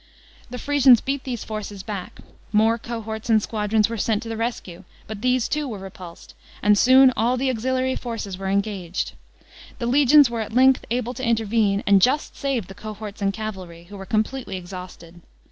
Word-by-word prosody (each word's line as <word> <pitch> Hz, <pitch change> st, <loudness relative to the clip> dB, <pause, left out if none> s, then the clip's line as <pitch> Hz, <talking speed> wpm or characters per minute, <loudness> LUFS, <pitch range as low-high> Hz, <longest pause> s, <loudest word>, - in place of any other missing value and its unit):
The 250 Hz, -, -6 dB
Frisians 270 Hz, -3 st, +5 dB
beat 275 Hz, +2 st, -3 dB
these 245 Hz, -4 st, -4 dB
forces 210 Hz, -3 st, -6 dB
back; 200 Hz, -3 st, -7 dB, 0.3 s
more 225 Hz, +2 st, +3 dB
cohorts 225 Hz, -1 st, -6 dB
and 220 Hz, -1 st, +5 dB
squadrons 210 Hz, 0 st, 0 dB
were 230 Hz, -1 st, -5 dB
sent 220 Hz, +2 st, 0 dB
to 230 Hz, -, -7 dB
the 225 Hz, -, -3 dB
rescue, 220 Hz, -6 st, -4 dB, 0.2 s
but 215 Hz, -1 st, -8 dB
these 250 Hz, -1 st, +1 dB
too 295 Hz, 0 st, -2 dB
were 225 Hz, -5 st, -5 dB
repulsed; 185 Hz, -3 st, -11 dB, 0.3 s
and 210 Hz, 0 st, +5 dB
soon 260 Hz, +4 st, +6 dB
all 240 Hz, +3 st, +1 dB
the 260 Hz, +1 st, 0 dB
auxiliary 260 Hz, +2 st, -1 dB
forces 225 Hz, -5 st, -5 dB
were 190 Hz, +1 st, -4 dB
engaged. 195 Hz, -3 st, -2 dB, 0.6 s
The 235 Hz, -, -4 dB
legions 280 Hz, +3 st, +6 dB
were 235 Hz, -1 st, -3 dB
at 220 Hz, 0 st, -6 dB
length 260 Hz, +1 st, +4 dB
able 245 Hz, +1 st, -2 dB
to 260 Hz, -, -7 dB
intervene, 220 Hz, -3 st, +1 dB
and 200 Hz, -1 st, +5 dB
just 265 Hz, +8 st, +1 dB
saved 265 Hz, -8 st, -2 dB
the 195 Hz, -, -10 dB
cohorts 210 Hz, 0 st, -8 dB
and 195 Hz, 0 st, +1 dB
cavalry, 190 Hz, -5 st, -7 dB
who 205 Hz, -, -10 dB
were 195 Hz, -1 st, -9 dB
com' 215 Hz, 0 st, +2 dB
pletely 260 Hz, -4 st, -7 dB
exhausted. 180 Hz, -2 st, -10 dB
220 Hz, 185 wpm, -23 LUFS, 200-250 Hz, 0.6 s, soon